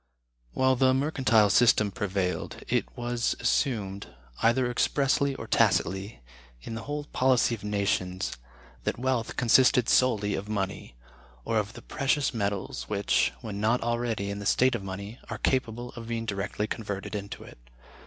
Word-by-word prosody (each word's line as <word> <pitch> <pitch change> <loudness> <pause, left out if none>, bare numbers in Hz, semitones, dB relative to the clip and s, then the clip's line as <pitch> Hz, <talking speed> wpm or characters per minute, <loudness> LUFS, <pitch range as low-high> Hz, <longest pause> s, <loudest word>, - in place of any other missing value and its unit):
While 130 - +3
the 130 0 +4
[Mercantile] 130 -7 +3
system 110 -1 +4
prevailed, 95 -4 -3
it - - +1
was 120 -1 -1
assumed, 105 -5 0 0.3
either 120 +2 +3
expressly 135 +2 +1
or - - -7
tacitly, 95 - +1 0.4
in 85 - -8
the 115 - -5
whole 145 0 -3
policy 130 -4 +2
of 110 - -6
nations, 100 -2 -1 0.5
that - - -1
wealth 125 -2 -1
consisted 125 0 +4
solely 105 -5 +3
of 100 +2 -4
money; 100 - -3 0.5
or 115 -1 +1
of 105 +2 -4
the - - -11
precious 140 0 0
metals, 100 -3 -3
which, 100 -1 +2
when 105 -2 -5
not 115 +3 +2
already 115 -4 -1
in 100 - -5
the 100 - -3
state 130 +4 +4
of 120 - -2
money, 100 +4 -7
are - - -4
capable 120 -2 -1
of 115 -2 -9
being 115 -1 -3
directly 105 0 -2
converted 100 -3 -5
into 100 -1 -5
it. - - -14
115 Hz, 155 wpm, -28 LUFS, 100-125 Hz, 0.5 s, the